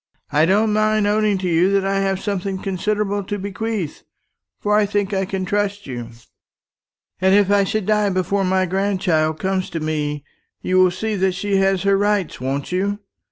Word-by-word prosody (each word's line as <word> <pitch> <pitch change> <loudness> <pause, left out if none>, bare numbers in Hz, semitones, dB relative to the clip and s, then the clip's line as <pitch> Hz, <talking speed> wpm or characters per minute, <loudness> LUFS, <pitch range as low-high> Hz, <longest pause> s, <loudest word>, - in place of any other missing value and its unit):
"I 150 +3 +3
don't 210 +3 +3
mind 215 0 +2
owning 210 -1 +2
to 185 -1 -3
you 175 +2 +3
that 195 -1 +2
I 195 0 +1
have 195 -1 0
something 195 -1 -3
considerable 200 +2 -1
to 205 - -3
bequeath; 200 -3 -4 0.6
for 210 0 +1
I 210 -1 +3
think 205 0 -1
I 190 0 0
can 190 0 -3
trust 205 +1 -1
you. 120 -3 -6 1.1
And 190 +1 +4
if 205 -1 +3
I 200 -1 +4
should 210 +1 -2
die 210 0 +2
before 190 +1 0
my 185 0 +2
grandchild 180 -4 0
comes 190 -1 -1
to 165 - -4
me, 150 -2 -2 0.4
you 185 0 +1
will 185 0 +6
see 215 +5 -3
that 190 0 +1
she 195 +2 -1
has 195 -1 +2
her 200 0 +3
rights, 205 -8 0
won't 135 +4 -3
you? 200 +3 0
195 Hz, 185 wpm, -20 LUFS, 185-205 Hz, 1.1 s, will